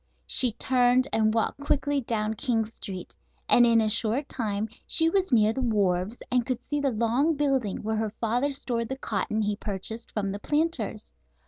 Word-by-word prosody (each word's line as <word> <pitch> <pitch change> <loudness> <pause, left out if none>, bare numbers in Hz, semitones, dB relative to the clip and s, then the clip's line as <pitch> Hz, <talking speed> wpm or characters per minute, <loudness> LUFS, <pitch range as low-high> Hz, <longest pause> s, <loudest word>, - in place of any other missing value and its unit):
She 250 -4 +4
turned 250 +2 +2
and 220 -1 +3
walked 225 +4 -1
quickly 285 0 0
down 220 -2 -1
King 225 -2 -1
Street, 195 -4 -8 0.3
and 240 0 +6
in 230 -1 +4
a 220 - +2
short 230 +5 +1
time 215 -3 -2 0.2
she 325 0 +4
was 380 -3 +1
near 220 -2 +4
the 265 - -3
wharves 205 -2 0
and 250 -1 +2
could 250 0 -4
see 295 0 -2
the 280 -1 +1
long 245 +7 +1
building 270 -8 -1
where 220 +1 -1
her 220 -1 -3
father 240 +5 0
stored 240 -4 -3
the 265 - -4
cotton 215 -2 -2
he 205 0 -1
purchased 215 +2 -5
from 200 -2 -2
the 200 - -5
planters. 295 - -2
230 Hz, 185 wpm, -26 LUFS, 215-265 Hz, 0.3 s, and